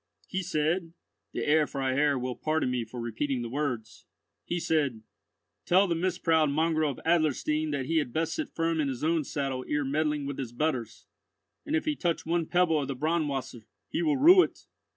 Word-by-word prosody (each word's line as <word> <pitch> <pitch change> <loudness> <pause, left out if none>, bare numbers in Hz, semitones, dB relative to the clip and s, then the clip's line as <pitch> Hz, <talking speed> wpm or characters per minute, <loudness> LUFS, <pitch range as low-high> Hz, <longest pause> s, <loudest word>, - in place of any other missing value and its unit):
"He 190 - -2
said—(the 165 0 -3
Herr 150 0 +3
Freiherr 135 +1 +1
will 125 0 -3
pardon 155 -4 0
me 125 -2 -1
for 115 +2 -9
repeating 120 +3 -2
the 115 - -6
words)—he 135 +5 -5
said, 140 -9 0 0.6
'Tell 185 +3 +5
the 170 - +1
misproud 165 -3 +2
mongrel 155 +1 +1
of - - -12
Adlerstein 155 -1 +1
that 140 -3 -2
he 165 +4 0
had 145 -6 0
best 160 +4 -1
sit 315 - -3
firm 165 0 -1
in 145 - 0
his 130 -1 -4
own 160 0 +2
saddle 135 -3 -3
ere 145 -1 0
meddling 150 +1 0
with 140 -1 -5
his 120 -3 -5
betters, 120 -5 -2 0.6
and 300 - 0
if 320 - 0
he 305 -1 0
touch 175 - -1
one 165 0 0
pebble 175 -4 +2
of 140 - -3
the 140 - -3
Braunwasser, 140 -6 -2 0.2
he 320 - -1
will 305 -4 +2
rue 350 +7 +8
it. - - -3
155 Hz, 185 wpm, -28 LUFS, 135-165 Hz, 0.6 s, rue